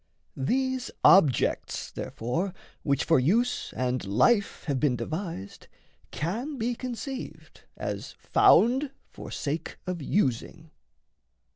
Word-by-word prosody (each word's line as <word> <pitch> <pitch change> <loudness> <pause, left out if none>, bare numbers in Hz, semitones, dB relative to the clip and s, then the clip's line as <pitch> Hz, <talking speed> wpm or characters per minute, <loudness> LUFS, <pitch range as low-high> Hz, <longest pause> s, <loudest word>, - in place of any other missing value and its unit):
These 260 - -1
objects, 150 - +4
therefore, 170 - -3 0.3
which 140 -2 +1
for 160 -4 +4
use 230 - +1
and 125 0 -1
life 130 - +2
Have 140 -5 -1
been 140 -3 +2
devised, 160 - -5 0.4
can 235 - -3
be 240 +1 -1
conceived 255 +2 -7 0.2
as - - -5
found 265 +5 +4 0.2
For - - -9
sake 155 +2 -4
of 180 -3 -3
using. 155 - -1
170 Hz, 105 wpm, -27 LUFS, -, 0.4 s, objects